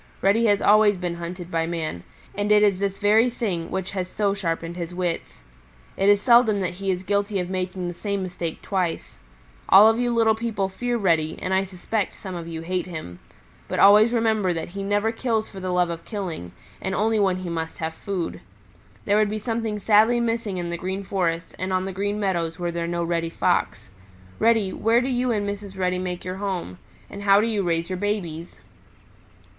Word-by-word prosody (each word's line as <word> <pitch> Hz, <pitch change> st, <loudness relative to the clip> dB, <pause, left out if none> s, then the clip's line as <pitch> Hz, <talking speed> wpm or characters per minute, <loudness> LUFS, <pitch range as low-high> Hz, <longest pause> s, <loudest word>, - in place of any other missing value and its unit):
Reddy 210 Hz, +4 st, +4 dB
has 205 Hz, -1 st, +2 dB
always 210 Hz, -1 st, +5 dB
been 175 Hz, -1 st, -3 dB
hunted 175 Hz, +1 st, -7 dB
by 165 Hz, 0 st, 0 dB
man, 160 Hz, -, -3 dB, 0.3 s
and 205 Hz, +1 st, -1 dB
it 210 Hz, 0 st, +6 dB
is 200 Hz, -3 st, +3 dB
this 195 Hz, -1 st, -1 dB
very 220 Hz, +4 st, +4 dB
thing 195 Hz, -9 st, -3 dB
which 190 Hz, -1 st, -3 dB
has 185 Hz, -2 st, -3 dB
so 200 Hz, 0 st, 0 dB
sharpened 165 Hz, -3 st, -3 dB
his 175 Hz, 0 st, -5 dB
wits. 175 Hz, -, -3 dB, 0.5 s
It 195 Hz, +1 st, +2 dB
is 205 Hz, 0 st, +6 dB
seldom 230 Hz, -1 st, +5 dB
that 180 Hz, -2 st, -2 dB
he 195 Hz, +2 st, -4 dB
is 185 Hz, 0 st, -1 dB
guilty 200 Hz, +1 st, 0 dB
of 180 Hz, 0 st, -3 dB
making 185 Hz, -1 st, -3 dB
the 175 Hz, -, -4 dB
same 200 Hz, +2 st, -3 dB
mistake 175 Hz, -3 st, -5 dB
twice. 185 Hz, -4 st, -2 dB, 0.5 s
All 200 Hz, +3 st, +9 dB
of 225 Hz, +1 st, +3 dB
you 245 Hz, 0 st, +1 dB
little 225 Hz, -2 st, +4 dB
people 220 Hz, -3 st, -2 dB
fear 240 Hz, +5 st, -2 dB
Reddy, 165 Hz, -6 st, +1 dB
and 185 Hz, -, -2 dB
I 190 Hz, +1 st, +3 dB
suspect 195 Hz, +3 st, -3 dB
some 190 Hz, -2 st, -8 dB
of 170 Hz, -1 st, -6 dB
you 165 Hz, -1 st, -5 dB
hate 180 Hz, +2 st, -2 dB
him. 155 Hz, -, -7 dB, 0.5 s
But -, -, -3 dB
always 210 Hz, +3 st, +7 dB
remember 220 Hz, -5 st, +1 dB
that 165 Hz, 0 st, -4 dB
he 200 Hz, +3 st, -6 dB
never 205 Hz, +2 st, +1 dB
kills 225 Hz, -2 st, -1 dB
for 195 Hz, -, -10 dB
the 185 Hz, 0 st, -4 dB
love 180 Hz, -1 st, +1 dB
of 165 Hz, 0 st, -6 dB
killing, 180 Hz, -, -5 dB, 0.3 s
and 190 Hz, 0 st, -2 dB
only 220 Hz, +1 st, +2 dB
when 195 Hz, -3 st, +2 dB
he 185 Hz, -1 st, -5 dB
must 160 Hz, -1 st, -4 dB
have 160 Hz, 0 st, -3 dB
food. 170 Hz, -, -4 dB, 0.6 s
There 205 Hz, 0 st, +3 dB
would 215 Hz, -1 st, +3 dB
be 215 Hz, -, -2 dB
something 225 Hz, -1 st, -2 dB
sadly 220 Hz, +3 st, +4 dB
missing 230 Hz, -4 st, -1 dB
in 175 Hz, -1 st, -3 dB
the 170 Hz, -, -3 dB
Green 190 Hz, +2 st, -3 dB
Forest 170 Hz, -4 st, -2 dB
and 185 Hz, +1 st, -2 dB
on 185 Hz, 0 st, 0 dB
the 190 Hz, -, -4 dB
Green 205 Hz, +2 st, -2 dB
Meadows 170 Hz, -5 st, -1 dB
were 175 Hz, -1 st, -2 dB
there 170 Hz, 0 st, -3 dB
no 170 Hz, 0 st, -1 dB
Reddy 165 Hz, -1 st, -1 dB
Fox. 165 Hz, -, 0 dB, 0.5 s
Reddy, 220 Hz, -4 st, +3 dB
where 230 Hz, +2 st, +3 dB
do 255 Hz, +2 st, -1 dB
you 250 Hz, -1 st, 0 dB
and 205 Hz, -3 st, -1 dB
Mrs. 200 Hz, -1 st, -6 dB
Reddy 180 Hz, -1 st, 0 dB
make 180 Hz, -1 st, -4 dB
your 185 Hz, +1 st, -4 dB
home? 185 Hz, -, -4 dB, 0.3 s
And 200 Hz, -, -9 dB
how 200 Hz, 0 st, +5 dB
do 215 Hz, -, +2 dB
you 220 Hz, -3 st, 0 dB
raise 170 Hz, -2 st, 0 dB
your 185 Hz, -, -2 dB
babies?" 180 Hz, -5 st, -3 dB
190 Hz, 210 wpm, -24 LUFS, 175-210 Hz, 0.6 s, All